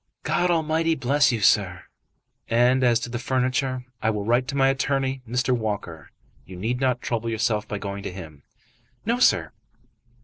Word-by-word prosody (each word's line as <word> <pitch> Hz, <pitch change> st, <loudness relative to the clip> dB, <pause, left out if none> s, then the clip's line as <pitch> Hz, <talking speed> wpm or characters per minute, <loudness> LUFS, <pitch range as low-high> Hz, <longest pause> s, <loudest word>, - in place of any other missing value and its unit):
"God 180 Hz, -, +1 dB
Almighty 165 Hz, 0 st, +1 dB
bless 145 Hz, +1 st, +2 dB
you, 115 Hz, -3 st, -2 dB
sir!" 95 Hz, -2 st, +2 dB, 0.7 s
"And 125 Hz, +3 st, +3 dB
as 120 Hz, -2 st, +4 dB
to 120 Hz, -, -5 dB
the 120 Hz, -, -3 dB
furniture, 130 Hz, +1 st, -1 dB, 0.2 s
I 110 Hz, -, +1 dB
will 105 Hz, -2 st, -2 dB
write 120 Hz, +3 st, +2 dB
to 140 Hz, -, -4 dB
my 135 Hz, 0 st, +4 dB
attorney, 135 Hz, 0 st, -1 dB
Mr. 125 Hz, +1 st, +1 dB
Walker. 100 Hz, -9 st, -4 dB, 0.3 s
You 90 Hz, +6 st, -11 dB
need 115 Hz, +7 st, -2 dB
not 125 Hz, -2 st, 0 dB
trouble 115 Hz, -1 st, -2 dB
yourself 110 Hz, -1 st, -1 dB
by 105 Hz, -, -4 dB
going 100 Hz, 0 st, -5 dB
to 95 Hz, -, -5 dB
him." 80 Hz, -6 st, -10 dB, 0.6 s
"No, 235 Hz, +3 st, 0 dB
sir." -, -, +3 dB
125 Hz, 170 wpm, -24 LUFS, 105-135 Hz, 0.7 s, as